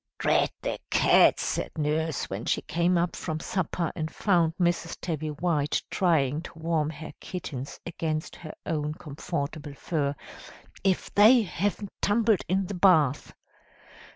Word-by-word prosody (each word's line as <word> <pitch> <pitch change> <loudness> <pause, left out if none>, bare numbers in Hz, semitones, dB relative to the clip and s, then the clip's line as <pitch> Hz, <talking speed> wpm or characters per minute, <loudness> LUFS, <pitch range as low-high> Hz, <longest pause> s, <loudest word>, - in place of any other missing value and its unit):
"'Drat - - +2
the - - -2
cats!' - - +5
said - - -2
Nurse, 155 0 -1
when - - -5
she - - 0
came 175 +2 +1
up 170 0 0
from 160 -2 -4
supper, 170 -1 -2
and 155 0 -3
found 170 -3 +1
Mrs. 170 -1 0
Tabby 155 -3 -3
White 150 -1 0
trying 155 -5 +2
to 170 - -11
warm 160 -2 0
her 155 0 -8
kittens 145 -7 -6
against 160 -2 -3
her 155 -2 -9
own 150 -2 -2
comfortable 145 -1 -5
fur; 145 -2 -1 0.7
'if 190 -1 0
they 225 +4 +7
haven't 200 +2 -3
tumbled 215 -1 +3
in 190 +1 +1
the 200 - -5
bath!' 160 -7 +3
165 Hz, 140 wpm, -27 LUFS, 150-180 Hz, 0.7 s, they